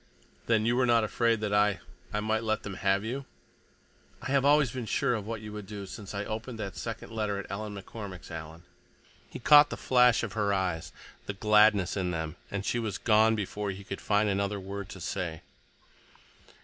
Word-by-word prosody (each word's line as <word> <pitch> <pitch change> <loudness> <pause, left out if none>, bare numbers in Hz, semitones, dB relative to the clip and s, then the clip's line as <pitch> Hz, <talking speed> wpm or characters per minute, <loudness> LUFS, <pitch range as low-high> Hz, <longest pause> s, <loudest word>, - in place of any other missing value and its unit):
"Then 110 -2 +3
you 120 +1 +2
were 125 0 +3
not 115 -1 +4
afraid 115 +1 +1
that 105 -1 -1
I—I 105 0 0
might 110 +1 0
let 110 -1 -1
them 100 - -5
have 100 +2 +1
you?" 130 +4 -4 0.9
"I - - -5
have 140 -1 +3
always 145 -3 +4
been 125 -2 -5
sure 135 +2 +1
of 105 -3 -3
what 115 -1 -4
you 105 -1 -8
would 105 -2 -7
do 100 -1 -6
since 100 +1 -8
I 100 0 -2
opened 115 +3 -5
that 100 -5 -5
second - - -6
letter 105 -3 -1
at 100 - -5
Ellen 105 +1 -4
McCormick's, 100 -2 -8
Alan!" 80 0 -8 0.7
He - - -7
caught 145 +4 +7
the - - -5
flash 125 -2 +4
of 110 -4 -4
her 100 -2 +1
eyes, 90 -4 -2 0.4
the 105 - -2
gladness 105 -2 +4
in 95 -3 -1
them, 80 -2 -3
and 100 0 -4
she 120 - 0
was 110 -4 -2
gone 110 0 +4
before 105 0 -3
he 100 +1 -6
could 100 0 -6
find 105 0 +2
another 100 0 0
word 100 0 -6
to 95 - -9
say. 85 -2 -4
105 Hz, 200 wpm, -29 LUFS, 100-110 Hz, 0.9 s, caught